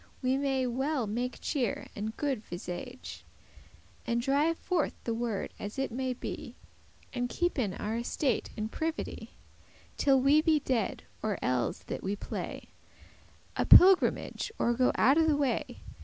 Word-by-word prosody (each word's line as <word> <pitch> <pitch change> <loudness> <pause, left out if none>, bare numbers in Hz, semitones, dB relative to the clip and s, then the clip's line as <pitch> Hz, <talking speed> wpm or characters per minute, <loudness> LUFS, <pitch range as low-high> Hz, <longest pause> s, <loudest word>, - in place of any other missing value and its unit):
We 255 +1 +2
may 270 -1 0
well 265 +2 -1
make 240 +4 -3
cheer 250 -8 -1
and 215 +2 -4
good 270 -7 -1
visage, 200 +9 -7 0.8
And 235 0 +1
drive 285 +6 +2
forth 350 -5 -1
the 230 - -1
world 225 -3 -2
as 205 +4 -6
it 270 -2 -1
may 255 +2 -2
be, 245 - -7 0.6
And 245 -1 -1
keepen 260 - -1
our 220 +2 -3
estate 250 +3 -1
in 215 0 -2
privity, 320 +8 -4 0.6
Till 270 -2 +4
we 280 +4 +5
be 310 -1 +3
dead, 255 -7 -1 0.2
or 210 -4 -1
elles 125 -1 0
that - - -5
we 195 +2 -2
play - - -6 0.9
A - - +1
pilgrimage, 385 +5 +6
or 240 - +2
go 255 +1 +3
out 275 +5 +5
of 320 - +4
the 300 -2 +3
way. 275 -4 -1
255 Hz, 150 wpm, -30 LUFS, 225-285 Hz, 0.9 s, pilgrimage